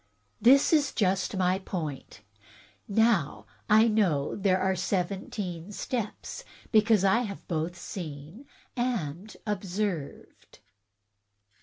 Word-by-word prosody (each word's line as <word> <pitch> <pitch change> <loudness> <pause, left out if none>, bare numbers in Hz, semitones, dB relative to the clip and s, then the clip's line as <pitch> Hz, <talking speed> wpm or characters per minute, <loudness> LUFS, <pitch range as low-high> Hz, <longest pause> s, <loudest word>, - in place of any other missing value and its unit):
That 270 +6 +6
is 295 -3 +3
just 195 0 0
my 185 0 +2
point. 155 - -6 0.7
Now, 200 - +2 0.2
I 220 +2 +6
know 185 -11 +1
that - - -6
there 190 -1 +3
are 190 0 +1
seventeen 185 -1 -3
steps, 235 - -4 0.3
because 215 -2 +4
I 195 +4 +4
have 205 -5 -6
both 165 +1 -2
seen 170 - -8 0.3
and 215 - -3
observed." 195 -5 -4
195 Hz, 105 wpm, -28 LUFS, 175-220 Hz, 0.7 s, That